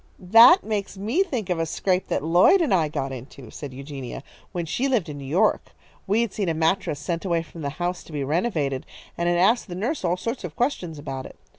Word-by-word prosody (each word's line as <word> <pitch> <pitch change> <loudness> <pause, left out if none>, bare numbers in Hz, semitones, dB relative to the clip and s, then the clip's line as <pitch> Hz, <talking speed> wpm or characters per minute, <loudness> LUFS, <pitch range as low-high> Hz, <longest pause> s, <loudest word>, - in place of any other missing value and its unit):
"That 240 - +9
makes 205 -2 -3
me 225 - 0
think 240 - -2
of 175 - 0
a 165 - +1
scrape 185 +3 0
that - - -1
Lloyd 175 - +5
and 315 - +1
I 165 -4 +3
got 135 -2 -3
into," 130 -1 -10
said 145 -3 -7
Eugenia, 135 -1 -7 0.3
"when 175 -3 -3
she 245 - -1
lived 240 - 0
in 145 -1 -6
New 140 - -8
York. 190 +10 +1 0.3
We 210 +4 +2
had 235 -4 -2
seen 200 -5 -1
a 165 - 0
mattress 160 -2 0
sent 165 +2 -3
away 170 -3 0
from 165 0 -11
the 140 - -2
house 175 +1 -2
to - - -13
be 145 -2 -2
renovated, 150 - -1 0.3
and 170 0 0
had 175 - +2
asked 215 +8 +3
the 175 - -6
nurse 230 - -2
all 175 0 +1
sorts 230 +5 -4
of 170 -4 -6
questions 185 - -1
about 135 -2 -6
it. - - -15
175 Hz, 235 wpm, -24 LUFS, 150-210 Hz, 0.3 s, That